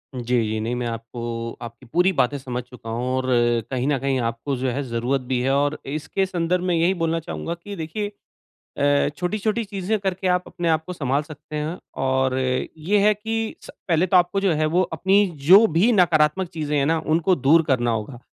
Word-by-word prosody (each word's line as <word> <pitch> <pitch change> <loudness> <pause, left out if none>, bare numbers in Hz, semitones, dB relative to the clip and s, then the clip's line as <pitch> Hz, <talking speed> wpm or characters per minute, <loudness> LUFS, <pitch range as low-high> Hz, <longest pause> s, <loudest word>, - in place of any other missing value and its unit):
जी, 125 - -4 0.2
जी। 110 0 -2
नहीं 115 +3 -2
मैं 120 -1 -2
आपको 115 0 -5
आपकी 120 +2 -9
पूरी 180 +2 +4
बातें 135 +3 +2
समझ 125 -2 -4
चूका 125 -2 -11
हूँ 120 +3 -2
और 130 0 -1 0.5
कहीं 130 +1 -1
न 145 - +2
कहीं 135 0 0
आपको 115 +5 -4
जो 130 +1 -1
है 130 +3 -2
ज़रूरत 125 +2 -1
भी 125 0 -2
है, 130 +2 +1
और 145 +2 +1
इसके 155 +7 -2
संदर्भ 180 -1 -1
में 180 -2 +1
यही 170 +3 +3
बोलना 165 0 +1
चाहूँगा 165 +1 -5
कि 205 -1 -7
देखिए 180 +5 -4 0.7
अ, 145 0 +3
छोटी-छोटी 215 +6 -1
चीज़ें 200 +1 -2
करके 190 -1 -1
आप 180 0 +1
अपने 175 -1 -3
आप 160 -1 +1
को 180 - -6
सँभाल 140 -4 0
सकते 150 0 -10
हैं 155 +4 -3 0.2
और 130 0 +1
ये 150 +9 -1
है 210 +1 +5
कि 225 +1 -3
स - - -10 0.2
पहले 170 +1 +3
तो 185 - +3
आपको 180 +2 +3
जो 195 -3 +2
है 155 0 +1
वो 175 +4 +2
अपनी 190 +6 +3 0.2
जो 200 +5 +9
भी 180 +9 +4
नकारात्मक 175 -2 +3
चीज़ें 150 -3 -2
हैं 140 - +2
ना, 165 +1 +2
उनको 165 +4 +3
दूर 155 +4 +4
करना 125 -5 +1
होगा। 115 +3 -3
155 Hz, 205 wpm, -23 LUFS, 130-180 Hz, 0.7 s, जो